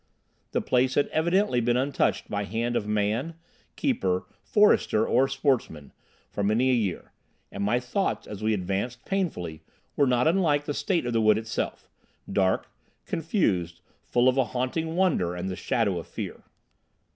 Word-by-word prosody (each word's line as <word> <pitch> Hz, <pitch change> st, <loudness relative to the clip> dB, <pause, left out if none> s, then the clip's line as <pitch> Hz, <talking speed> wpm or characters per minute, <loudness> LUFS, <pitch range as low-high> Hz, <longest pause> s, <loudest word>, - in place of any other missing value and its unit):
The -, -, -1 dB
place 130 Hz, +1 st, +1 dB
had 145 Hz, -, +3 dB
evidently 170 Hz, -4 st, +2 dB
been 120 Hz, +1 st, +2 dB
untouched 135 Hz, +2 st, 0 dB
by 100 Hz, 0 st, -2 dB
hand 115 Hz, +4 st, -2 dB
of 105 Hz, -, -1 dB
man, 105 Hz, +9 st, 0 dB, 0.4 s
keeper, 95 Hz, -, 0 dB, 0.2 s
forester 205 Hz, -, +3 dB
or 135 Hz, -, +3 dB
sportsman, 135 Hz, -, -1 dB, 0.4 s
for -, -, -3 dB
many 110 Hz, +6 st, +2 dB
a -, -, +3 dB
year; 105 Hz, -8 st, -1 dB, 0.4 s
and 100 Hz, -, -4 dB
my 120 Hz, +5 st, +2 dB
thoughts, 160 Hz, +11 st, -2 dB
as 105 Hz, -1 st, -8 dB
we 110 Hz, 0 st, +1 dB
advanced 100 Hz, +6 st, -3 dB
painfully, 90 Hz, -, -2 dB, 0.3 s
were 140 Hz, -, +3 dB
not 125 Hz, +3 st, +3 dB
unlike 160 Hz, -5 st, +2 dB
the 145 Hz, -, -2 dB
state 175 Hz, -1 st, 0 dB
of 120 Hz, -, -2 dB
the 115 Hz, -, +2 dB
wood 110 Hz, -1 st, +5 dB
itself—dark, 100 Hz, -3 st, -3 dB, 0.4 s
confused, 100 Hz, -, -1 dB, 0.2 s
full 120 Hz, +1 st, +2 dB
of 130 Hz, +1 st, +3 dB
a 130 Hz, -, +3 dB
haunting 145 Hz, +7 st, -2 dB
wonder 155 Hz, -, +1 dB
and 90 Hz, +2 st, -3 dB
the 95 Hz, -, -3 dB
shadow 100 Hz, 0 st, 0 dB
of -, -, -9 dB
fear. -, -, -7 dB
120 Hz, 155 wpm, -26 LUFS, 100-145 Hz, 0.4 s, wood